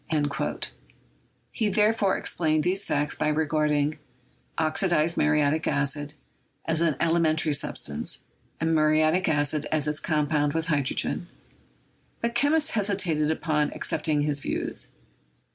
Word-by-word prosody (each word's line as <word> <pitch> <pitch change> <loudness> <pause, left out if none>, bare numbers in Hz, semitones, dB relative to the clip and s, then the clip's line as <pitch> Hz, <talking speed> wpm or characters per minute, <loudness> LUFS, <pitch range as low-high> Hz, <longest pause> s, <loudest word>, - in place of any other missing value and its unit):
He 220 -3 -1
therefore 210 -1 +2
ex - - -1
plained 155 -2 +1
these 190 +3 0
facts 145 0 0
by - - -1
regarding 150 -1 0 0.6
"oxidized 165 0 +2
muriatic 150 +1 +2
acid" 145 +1 -1 0.5
as 160 0 +1
an 165 -4 +2
elementary 160 -2 +2
substance, 75 - 0 0.4
and 165 0 0
muriatic 155 +3 +3
acid 145 0 0
as 155 -2 0
its 150 0 -1
com 150 -2 0
pound 145 -1 +1
with 165 +1 -2
hydrogen; 140 -4 0 0.9
but 235 0 -2
chemists 295 +5 +2
hesitated 190 -8 0
about 155 -2 0
ac - - -8 0.2
cepting 150 -2 0
his 145 -1 +1
views. - - -2
155 Hz, 125 wpm, -26 LUFS, 150-170 Hz, 0.9 s, muriatic